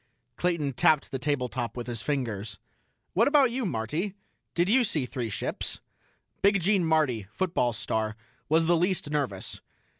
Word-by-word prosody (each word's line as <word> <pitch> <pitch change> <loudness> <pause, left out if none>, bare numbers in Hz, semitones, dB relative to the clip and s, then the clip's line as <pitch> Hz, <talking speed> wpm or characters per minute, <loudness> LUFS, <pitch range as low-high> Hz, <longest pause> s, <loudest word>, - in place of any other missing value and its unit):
Clayton 170 -6 0
tapped 150 +3 +3
the 135 - -2
tabletop 125 -3 -2
with 120 - -4
his 120 -3 -4
fingers. 110 -8 -2 0.6
"What 220 +6 +4
about 280 -4 +5
you, 250 0 -2
Marty? 170 - -2 0.4
Did 175 +1 +3
you 245 +5 +5
see 155 - 0
three 125 -2 -4
ships?" 100 - -3 0.6
Big 200 0 +4
Gene 190 +1 +3
Marty, 145 -11 +2
football 145 -3 +1
star, 110 0 -2 0.3
was 160 +2 +4
the 175 +1 +4
least 175 -3 0
nervous. 135 -11 -2
150 Hz, 150 wpm, -28 LUFS, 120-180 Hz, 0.6 s, about